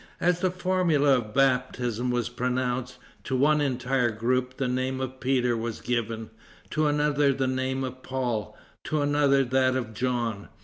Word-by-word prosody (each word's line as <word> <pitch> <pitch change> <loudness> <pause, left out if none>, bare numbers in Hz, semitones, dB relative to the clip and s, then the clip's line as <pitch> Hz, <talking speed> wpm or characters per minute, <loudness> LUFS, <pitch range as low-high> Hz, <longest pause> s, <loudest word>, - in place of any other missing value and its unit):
As 175 0 +2
the 185 0 +2
formula 175 -7 +2
of 110 -3 -7
baptism 125 -3 +1
was 120 -1 0
pronounced, 125 0 -2 0.3
to 130 - -2
one 150 +3 +3
entire 130 -2 +1
group 125 +3 -1
the 135 -3 0
name 130 +1 -1
of 130 0 -5
Peter 125 -2 +1
was 115 0 -4
given, 115 -2 -3 0.4
to 155 0 +1
another 145 -1 +2
the 135 0 -1
name 130 +1 -1
of 130 0 -6
Paul, 125 -5 -3 0.3
to 155 -1 0
another 145 -1 +3
that 130 0 +2
of 120 -4 -3
John. 120 -3 -2
130 Hz, 160 wpm, -27 LUFS, 120-140 Hz, 0.4 s, one